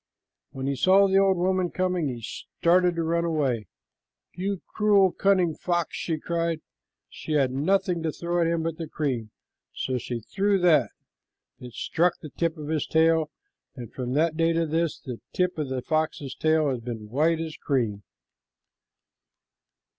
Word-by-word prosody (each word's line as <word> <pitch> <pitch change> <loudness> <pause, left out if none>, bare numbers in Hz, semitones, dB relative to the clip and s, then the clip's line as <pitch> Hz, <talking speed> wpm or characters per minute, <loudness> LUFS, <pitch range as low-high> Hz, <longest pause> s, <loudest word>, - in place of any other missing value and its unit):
When 135 0 -6
he 140 0 0
saw 190 +8 +5
the 195 0 +4
old 195 -1 +3
woman 185 0 +1
coming, 180 -3 0
he 120 -3 -5
started 175 +8 +1
to 165 - -1
run 170 +1 +1
away. 140 - 0 0.7
"You 190 +1 -3
cruel, 205 -3 +3
cunning 185 -4 +2
fox!" 175 +2 -1
she 165 -2 -2
cried. 165 0 -2 0.5
She 155 - -6
had 135 -4 +2
nothing 175 +5 +1
to 160 -1 -1
throw 175 +2 -1
at 165 - +3
him 165 -1 0
but 165 -1 -3
the 165 - -4
cream, 130 -9 -2 0.5
so 130 -1 -2
she 120 0 -4
threw 195 - 0
that. 155 -8 +4 0.7
It 125 -2 -10
struck 175 +6 +1
the 155 - -10
tip 165 -1 -1
of 150 -1 -7
his 155 -2 -1
tail, 160 -1 +3 0.5
and 120 -4 -9
from 125 -1 -4
that 155 +2 +2
day 165 +1 +2
to 165 0 +1
this, 165 +1 0
the 125 -4 -8
tip 180 0 +1
of 145 -3 -2
the 130 -1 -3
fox's 155 -2 -1
tail 155 -2 +2
has 125 - -2
been 115 -2 -6
as - - -10
white 160 +7 +2
as 160 -1 -4
cream. 115 -8 -1
160 Hz, 170 wpm, -26 LUFS, 135-175 Hz, 0.7 s, saw